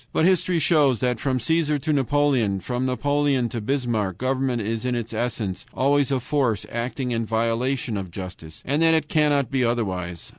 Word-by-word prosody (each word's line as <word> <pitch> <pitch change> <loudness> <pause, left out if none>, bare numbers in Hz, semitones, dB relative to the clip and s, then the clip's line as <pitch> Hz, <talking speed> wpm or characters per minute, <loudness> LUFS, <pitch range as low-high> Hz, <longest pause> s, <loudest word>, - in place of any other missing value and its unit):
But 160 - +2
history 185 -1 +2
shows 145 - +3
that 125 -2 0
from 130 -1 0
Caesar 150 +3 +1
to 150 +2 -1
Napoleon, 140 -5 +2
and 95 -2 -5
from 125 +4 -2
Napoleon 140 -1 +1
to 115 -1 -4
Bismarck, 115 -6 -1
government 130 0 0
is 115 +2 -2
in 125 -1 0
its 115 -1 -4
essence 110 -4 -2
always 140 0 +2
a 135 -2 +1
force 125 -6 0
acting 125 +2 -3
in 115 -1 0
violation 115 +2 -1
of 95 -2 -5
justice, 90 -3 -9
and 145 +4 0
that 165 0 +5
it 160 -2 0
cannot 145 -4 +2
be 135 -2 +1
otherwise. 95 -8 -2
125 Hz, 185 wpm, -23 LUFS, 115-145 Hz, -, that